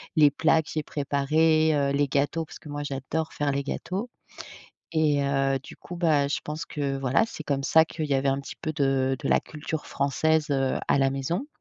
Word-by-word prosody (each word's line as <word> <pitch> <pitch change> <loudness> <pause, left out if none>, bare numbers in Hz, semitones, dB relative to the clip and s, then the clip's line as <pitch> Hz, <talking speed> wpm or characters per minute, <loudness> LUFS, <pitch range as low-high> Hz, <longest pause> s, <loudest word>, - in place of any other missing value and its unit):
les 150 -3 +6
plats 160 +2 +3
que - - -13
j'ai 155 - -1
préparés, 155 +3 +2
heu, 140 -1 +1
les 140 +1 +2
gâteaux, 145 +4 0
parce - - -12
que 150 - -12
moi 145 0 -4
j'adore 145 +3 -3
faire 145 -1 0
les 140 0 -1
gâteaux 190 - -4 0.8
et 150 -3 +2
heu, 135 -1 +1
du - - -11
coup, 175 - -9
bah 155 -5 +2
je 140 - -1
pense 150 +1 -5
que, 140 -2 -2
voilà, 135 - +2
c'est 190 -8 -8
comme 140 -2 -1
ça 160 +3 +5
qu'il 160 -1 -4
y 145 - 0
avait 135 +1 +1
un 135 0 +1
petit 135 - -9
peu 155 -1 -2
de 135 -2 +1
de 140 - -3
la - - +4
culture 155 0 -6
française, 155 +3 +1
heu, 135 -1 +1
à - - +3
la 135 0 +3
maison. 165 - -2
145 Hz, 215 wpm, -26 LUFS, 140-155 Hz, 0.8 s, les